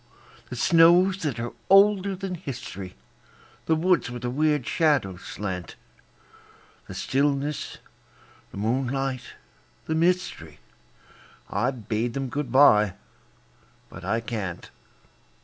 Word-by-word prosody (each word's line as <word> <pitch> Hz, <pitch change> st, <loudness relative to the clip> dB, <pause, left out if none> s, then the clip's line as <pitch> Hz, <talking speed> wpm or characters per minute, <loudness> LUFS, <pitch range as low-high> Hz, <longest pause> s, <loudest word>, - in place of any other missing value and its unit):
The 125 Hz, -, -6 dB
snows 175 Hz, +7 st, +5 dB
that 140 Hz, -8 st, -2 dB
are 120 Hz, +1 st, -4 dB, 0.2 s
older 195 Hz, 0 st, +5 dB
than 190 Hz, 0 st, -5 dB
history, 125 Hz, -, -7 dB, 0.7 s
The 160 Hz, -, +3 dB
woods 170 Hz, -5 st, +2 dB
where 120 Hz, 0 st, -6 dB
the 120 Hz, 0 st, -3 dB
weird 150 Hz, -1 st, +1 dB
shadows 135 Hz, -, +1 dB
slant; 95 Hz, -3 st, -6 dB, 1.1 s
The -, -, -8 dB
stillness, 140 Hz, +2 st, -1 dB, 0.7 s
the -, -, -11 dB
moonlight, 130 Hz, +4 st, -2 dB, 0.5 s
the 160 Hz, -, -2 dB
mystery, 165 Hz, -, 0 dB, 0.9 s
I've 125 Hz, -3 st, -2 dB
bade 115 Hz, +3 st, -1 dB
'em 135 Hz, -1 st, -3 dB
good 145 Hz, +2 st, -4 dB
by 105 Hz, -8 st, +5 dB, 0.9 s
but -, -, -11 dB
I 115 Hz, +1 st, 0 dB
can't. 105 Hz, -6 st, -5 dB
135 Hz, 110 wpm, -25 LUFS, 115-160 Hz, 1.1 s, snows